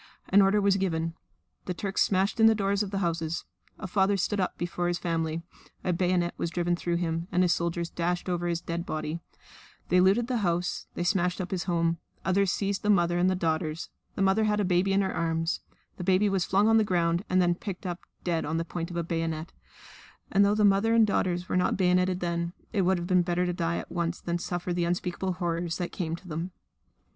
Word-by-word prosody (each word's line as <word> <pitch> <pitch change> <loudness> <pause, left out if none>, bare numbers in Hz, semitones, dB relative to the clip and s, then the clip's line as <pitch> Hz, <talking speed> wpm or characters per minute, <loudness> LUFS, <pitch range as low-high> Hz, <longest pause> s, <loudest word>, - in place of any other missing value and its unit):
An 200 +1 +6
order 195 +2 +4
was 200 -1 +3
given. 165 -4 -1 0.5
The 180 - -3
Turks 195 +1 -2
smashed 195 +3 +2
in 225 - +7
the 225 - +5
doors 200 -1 +1
of 205 - -2
the 195 - -3
houses. 165 -1 -2 0.3
A - - -7
father 195 +2 +2
stood 205 +2 0
up 185 - -1
before 175 0 -2
his 175 0 0
family; 165 -1 -2 0.4
a 180 - +1
bayonet 175 0 +1
was 170 - -1
driven 175 +1 0
through 175 0 -2
him 165 0 -1
and 180 -1 +3
soldiers 170 0 -1
dashed 175 +1 -1
over 175 -1 -1
his 170 -1 -1
dead 170 0 -3
body; 155 -1 -3 0.7
they 180 +1 +5
looted 195 +6 +4
the 250 0 -1
house; 175 -4 -1
they - - -1
smashed 180 0 +1
up 185 - -4
his 185 -2 -2
home; 170 -2 +1 0.3
others 190 +1 +2
seized 200 0 -1
the 210 - -1
mother 175 -3 +3
and 180 +1 +4
the 185 - +1
daughters 160 -2 -1 0.3
the 195 - +1
mother 195 +3 +3
had 210 0 +1
a 205 - +2
baby 180 +2 +2
in 195 +1 +3
her 190 - -1
arms; 165 0 -1 0.4
the 180 - -5
baby 190 +3 +3
was 195 -2 +1
flung 200 +3 +3
on 225 0 +5
the 220 - +5
ground 175 -2 +1
and 185 - +3
then 175 -1 +4
picked 190 +1 -7
up 175 -1 -3 0.2
dead 170 -2 0
on 160 +2 -2
the 165 - -1
point 170 -1 -4
of 175 - -5
a 170 - 0
bayonet; 165 -1 -3 0.8
and, 200 - +5
though 200 +1 +3
the 210 -1 +3
mother 205 +3 +4
and 225 -1 +6
daughters 180 -3 0
were - - -2
not 180 0 +2
bayoneted 180 0 +2
then, 170 0 -2 0.2
it 205 - +2
would 185 0 +3
have 175 - -4
been 180 0 +3
better 175 +1 0
to 180 - -1
die 170 -1 -1
at - - -6
once 170 0 -2
than 170 0 -2
to 175 - -7
suffer 175 0 -2
the 175 0 0
unspeakable 180 +2 -1
horrors 170 -1 -2
that 175 - -3
came 165 -3 -3
to 180 - -14
them. 165 +2 -3
180 Hz, 230 wpm, -28 LUFS, 170-195 Hz, 0.8 s, in